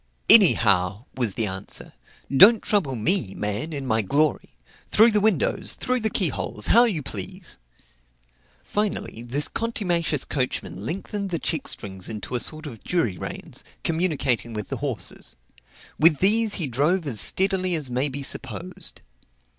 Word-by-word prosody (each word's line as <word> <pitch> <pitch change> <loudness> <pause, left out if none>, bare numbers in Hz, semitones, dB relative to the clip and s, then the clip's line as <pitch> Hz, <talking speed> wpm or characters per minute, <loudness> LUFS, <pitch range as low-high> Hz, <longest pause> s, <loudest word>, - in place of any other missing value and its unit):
"Any 205 -7 +10
how," 100 +1 +1
was 120 -6 -1
the 115 - -1
answer; 95 0 -7 0.4
"don't 210 - +7
trouble 170 -11 0
me, 120 - +1
man, 105 +9 -4
in 140 -3 -5
my 110 -3 +1
glory; 145 +8 -1 0.3
through 225 +2 +5
the 210 - +2
windows, 220 - +1
through 255 0 -1
the 220 -1 -1
key 190 -5 +2
holes 105 -4 -2
how 235 +3 +7
you 180 -11 -2
please." 185 - -8 1.0
Finally 205 - -3
this 130 +5 -1
contumacious 175 - -2
coachman 100 - -3
lengthened 195 - -4
the 170 - -2
checkstrings 100 - -3
into 105 -3 -7
a 125 - 0
sort 155 +5 -3
of 120 -8 -10
jury 165 - -1
reins, - - -7 0.2
communicating 150 -9 -1
with 105 -2 -6
the - - -4
horses; - - -4 0.6
with 155 -1 +5
these 215 +4 +3
he 170 - 0
drove 150 +8 0
as 120 -7 +3
steadily 190 -2 +3
as 145 -6 -3
may 130 +4 0
be 140 +1 -6
supposed. 105 -9 -6
150 Hz, 150 wpm, -23 LUFS, 115-190 Hz, 1.0 s, Any